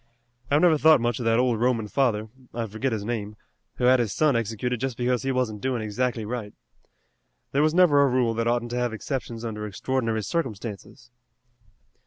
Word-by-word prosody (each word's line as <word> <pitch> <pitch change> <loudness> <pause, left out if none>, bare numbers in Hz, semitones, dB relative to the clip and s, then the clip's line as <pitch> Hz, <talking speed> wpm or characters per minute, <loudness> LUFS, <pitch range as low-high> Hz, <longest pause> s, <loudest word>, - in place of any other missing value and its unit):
I've 145 +2 +3
never 160 -4 +5
thought 160 -1 +6
much 120 -1 -1
of 120 - -4
that 115 0 +3
old 125 -3 +2
Roman 120 -3 +1
father 110 -3 0 0.3
I 115 -1 -1
forget 110 +5 -3
his 105 -2 -3
name 105 -2 -4 0.4
who - - -5
had 130 +1 +5
his 115 -4 0
son 150 +2 +2
executed 115 +2 -2
just 130 -2 -3
because 125 0 0
he 135 - -1
wasn't 120 -5 -1
doin' 130 -4 -1
exactly 115 +1 -2
right. 110 -2 -5 1.0
There 140 - +2
was 155 +2 +2
never 170 -6 +5
a 140 - +5
rule 125 -2 +1
that 115 +1 -1
oughtn't 120 0 0
to 120 - -2
have 120 -2 -1
exceptions 120 -1 -5
under 105 -2 -4
extraordinary 115 +1 -2
circumstances." 120 - -5
120 Hz, 190 wpm, -25 LUFS, 110-130 Hz, 1.0 s, thought